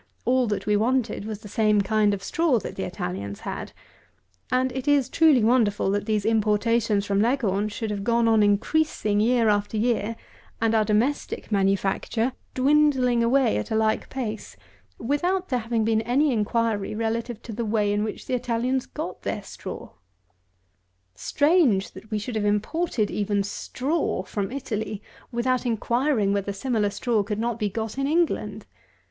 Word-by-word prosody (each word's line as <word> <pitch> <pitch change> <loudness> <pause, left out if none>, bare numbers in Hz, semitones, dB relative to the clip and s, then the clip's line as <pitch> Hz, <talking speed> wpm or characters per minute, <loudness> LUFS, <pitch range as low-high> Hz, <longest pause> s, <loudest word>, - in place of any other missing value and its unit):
All 255 0 +2
that 200 -2 -2
we 210 0 +2
wanted 230 -1 0
was 215 -1 -6
the 215 - -10
same 210 0 +2
kind 210 +1 +2
of 195 - -10
straw 320 +3 +2
that - - -5
the 190 - -3
Italians 100 - -5
had: - - -5 0.8
and 255 0 +2
it 260 +1 -5
is 285 -3 +3
truly 310 -8 +4
wonderful 215 -4 +2
that 205 +1 -1
these 210 -2 0
importations 215 -1 +2
from 200 0 +1
Leghorn 215 -4 +1
should 215 +1 -4
have 200 -1 -3
gone 235 +1 +2
on 220 -1 +4
increasing 210 +1 +1
year 230 +1 +3
after 205 +1 +1
year, 230 -1 0 0.4
and 225 0 +1
our 220 -1 +4
domestic 225 +5 -1
manufacture 200 +4 0 0.2
dwindling 260 -3 +3
away 255 - +3
at 105 - -4
a - - -1
like 220 0 +1
pace, 225 -5 -5 0.4
without 355 +9 -1
there 250 - +1
having 225 -1 -1
been 220 0 +2
any 260 +5 +2
inquiry 220 -1 0
relative 230 +1 -2
to 230 - -7
the 235 +3 -3
way 210 -2 +1
in 205 0 0
which 215 - -5
the - - -4
Italians 250 +1 -1
got - - -6
their - - -3
straw! - - -8 1.2
Strange, 285 - +2
that 215 - -13
we 215 - -1
should 225 +4 -5
have 215 - 0
imported 215 +4 0
even 205 -1 0
straw 260 - -2
from 200 +2 -4
Italy, 220 -6 -4 0.3
without 255 +1 0
inquiring 235 -2 +1
whether 200 0 -1
similar 210 0 0
straw 225 +1 0
could 205 +1 -3
not 235 +1 -2
be 210 -2 0
got 220 +4 -4
in 275 - 0
England! 285 - 0
225 Hz, 165 wpm, -25 LUFS, 205-250 Hz, 1.2 s, truly